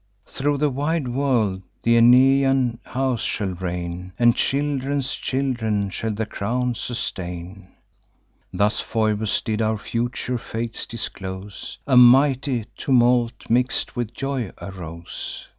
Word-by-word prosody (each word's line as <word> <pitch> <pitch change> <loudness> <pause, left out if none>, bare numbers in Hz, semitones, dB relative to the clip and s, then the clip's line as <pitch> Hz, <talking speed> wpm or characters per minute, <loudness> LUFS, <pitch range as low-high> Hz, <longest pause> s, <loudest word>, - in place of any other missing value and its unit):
Through 145 +1 -1
the 150 0 +1
wide 145 +1 -1
world 120 -8 +1 0.2
th' - - 0
Aeneian 130 +1 +5
house 130 -2 -1
shall 95 -3 -2
reign, 90 0 -5
And 120 -1 +5
children's 140 -1 0
children 110 -7 -1
shall 110 - -3
the 110 +1 -2
crown 120 +4 -1
sustain.' 95 -5 -5 0.8
Thus 105 +3 +1
Phoebus 110 -1 0
did 110 0 -1
our 110 0 +1
future 120 +3 -2
fates 115 0 -4
disclose: 95 -3 -7
A 130 -3 +4
mighty 130 -1 +5
tumult, 120 -2 +2
mix'd 125 +2 +1
with 120 -2 -3
joy, 135 -7 -2
arose. 85 -2 -7
120 Hz, 115 wpm, -23 LUFS, 100-130 Hz, 0.8 s, Aeneian